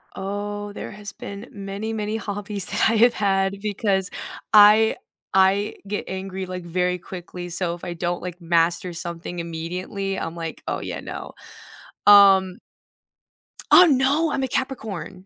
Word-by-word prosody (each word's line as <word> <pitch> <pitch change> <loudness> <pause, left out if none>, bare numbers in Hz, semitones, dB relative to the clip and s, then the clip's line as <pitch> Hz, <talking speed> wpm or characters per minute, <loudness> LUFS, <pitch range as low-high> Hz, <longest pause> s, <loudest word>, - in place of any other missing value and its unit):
Oh, 205 +1 -4
there - - -7
has 205 -1 -8
been 200 +4 -9
many, 200 +2 -5
many 215 0 -2
hobbies 205 -2 -4
that - - +2
I 225 - +1
have 235 +2 +5
had 195 -1 0
because 200 -2 -1 0.4
I 215 +1 +7 0.4
I 195 +2 +3
get 205 +1 -3
angry, 190 0 -5
like, 180 -1 -6
very 180 +1 -1
quickly, 175 0 -8
so 175 0 -2
if 175 - -16
I 175 -1 -4
don't, 175 +1 -3
like, 180 0 -7
master 170 +1 +1
something 170 +1 -6
immediately, 180 +4 -4
I'm 165 - -4
like, 165 -1 -6
"Oh, - - -2
yeah, - - -5
no," - - -7 0.7
um 195 -2 +7 1.1
Ah, 365 - +9
no, 290 +2 +2
I'm 270 - -1
a - - 0
Capricorn. 220 -8 -4
195 Hz, 150 wpm, -23 LUFS, 180-210 Hz, 1.1 s, Ah